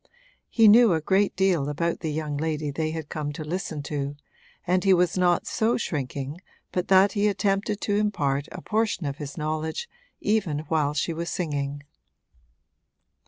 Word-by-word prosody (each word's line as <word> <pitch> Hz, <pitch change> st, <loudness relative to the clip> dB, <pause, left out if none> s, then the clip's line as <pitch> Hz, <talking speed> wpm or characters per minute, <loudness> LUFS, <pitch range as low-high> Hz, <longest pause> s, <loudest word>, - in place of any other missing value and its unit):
He 225 Hz, -2 st, +5 dB
knew 225 Hz, -1 st, +7 dB
a 160 Hz, -, +1 dB
great 195 Hz, +5 st, +1 dB
deal 180 Hz, -7 st, +2 dB
about 170 Hz, +3 st, -1 dB
the 160 Hz, -, -3 dB
young 150 Hz, -1 st, -3 dB
lady 150 Hz, -1 st, -2 dB
they 155 Hz, +2 st, -2 dB
had 160 Hz, -1 st, -5 dB
come 150 Hz, -1 st, -4 dB
to 155 Hz, -, -6 dB
listen 160 Hz, -2 st, -4 dB
to, 145 Hz, -1 st, -3 dB, 0.5 s
and 180 Hz, 0 st, +2 dB
he 195 Hz, -2 st, +5 dB
was 175 Hz, -1 st, +2 dB
not 180 Hz, -1 st, +2 dB
so 225 Hz, +2 st, +1 dB
shrinking 145 Hz, -, -4 dB, 0.3 s
but 180 Hz, -1 st, -2 dB
that 195 Hz, +1 st, +6 dB
he 205 Hz, 0 st, +1 dB
attempted 200 Hz, 0 st, 0 dB
to 205 Hz, -1 st, 0 dB
impart 145 Hz, -10 st, 0 dB
a -, -, -8 dB
portion 215 Hz, -5 st, 0 dB
of 140 Hz, 0 st, -3 dB
his 145 Hz, 0 st, -7 dB
knowledge 155 Hz, -, -3 dB, 0.3 s
even 190 Hz, -9 st, 0 dB
while 150 Hz, -2 st, +1 dB
she 165 Hz, +2 st, 0 dB
was 170 Hz, +1 st, -4 dB
singing. 145 Hz, -5 st, -3 dB
160 Hz, 165 wpm, -25 LUFS, 150-195 Hz, 0.5 s, knew